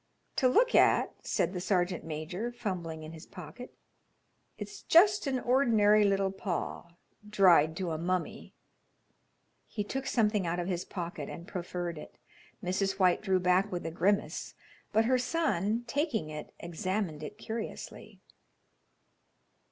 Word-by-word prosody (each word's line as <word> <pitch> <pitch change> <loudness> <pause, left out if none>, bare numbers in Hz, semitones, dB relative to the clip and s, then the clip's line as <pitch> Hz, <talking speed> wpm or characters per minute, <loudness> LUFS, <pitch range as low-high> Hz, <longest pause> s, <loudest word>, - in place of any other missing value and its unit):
"To 260 - +4
look 470 - +3
at," - - +4
said 175 +2 0
the 180 - -3
sergeant 180 -1 0
major, 165 +9 -4
fumbling 175 -9 -4
in 155 - -8
his 160 +1 -11
pocket, 185 +8 -10 0.8
"it's - - -8
just 395 +1 +5
an 260 -2 0
ordinary 225 -5 +4
little 195 -1 +2
paw, 175 -2 -4 0.3
dried 170 -6 +5
to 180 -3 -2
a 155 - -3
mummy." 180 +1 -3 1.1
He 210 - -3
took 265 +6 -4
something 210 -5 +1
out 170 +1 -1
of 175 0 -2
his 180 -2 -2
pocket 175 -2 -5
and 170 +1 -8
proffered 175 -2 -4
it. - - -12 0.5
Mrs. 190 +1 0
White 185 -2 +3
drew 190 -3 +2
back 185 +3 +2
with 175 -1 -4
a 165 - -3
grimace, 195 +5 0 0.4
but 220 +1 +3
her 255 +2 +3
son, 240 - 0
taking 240 - -1
it, 150 0 -7
examined 170 -1 -3
it 155 +7 -7
curiously. 220 +1 -7
190 Hz, 140 wpm, -30 LUFS, 170-220 Hz, 1.1 s, just